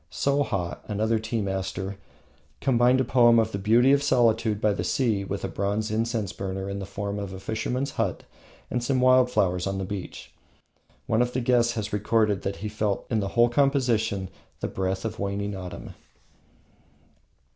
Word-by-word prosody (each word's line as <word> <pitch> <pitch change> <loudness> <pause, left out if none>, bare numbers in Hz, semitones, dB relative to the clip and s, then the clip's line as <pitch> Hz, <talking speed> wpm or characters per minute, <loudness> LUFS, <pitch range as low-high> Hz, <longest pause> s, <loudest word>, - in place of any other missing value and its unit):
Shoha, 125 -11 -1
another 110 +2 0
tea 110 +1 -2
master, 95 0 -3 0.6
combined 125 0 +3
a - - +3
poem 120 -1 +5
on 110 - +2
the 100 - -3
Beauty 115 +6 +4
of 140 0 +4
Solitude 115 -5 +2
by 105 -1 +2
the - - -3
Sea 110 -7 0
with 100 0 -4
a - - 0
bronze 105 +2 -2
incense 110 -2 -1
burner 95 0 -4
in 100 0 -4
the 95 - -6
form 100 0 -4
of 100 -2 -5
a 95 - -7
fisherman's 125 +7 -2
hut 100 -6 -2 0.5
and 125 - -1
some 130 +1 +1
wild 130 0 +5
flowers 90 -6 +1
of 95 0 -2
the 95 - -3
beach. 95 -1 -7 0.7
One 110 +2 +2
of 125 0 0
the 130 - 0
guests 120 -1 +2
has 110 -2 -4
recorded 105 -1 +1
that 100 - -3
he - - 0
felt 105 -1 -2
in 110 - +2
the 100 - -1
whole 120 0 +6
composition 120 -8 +1 0.3
the - - -2
breath 95 +1 -2
of 110 -1 -4
waning 100 0 -2
autumn. 90 -2 -8
110 Hz, 180 wpm, -26 LUFS, 100-120 Hz, 0.7 s, whole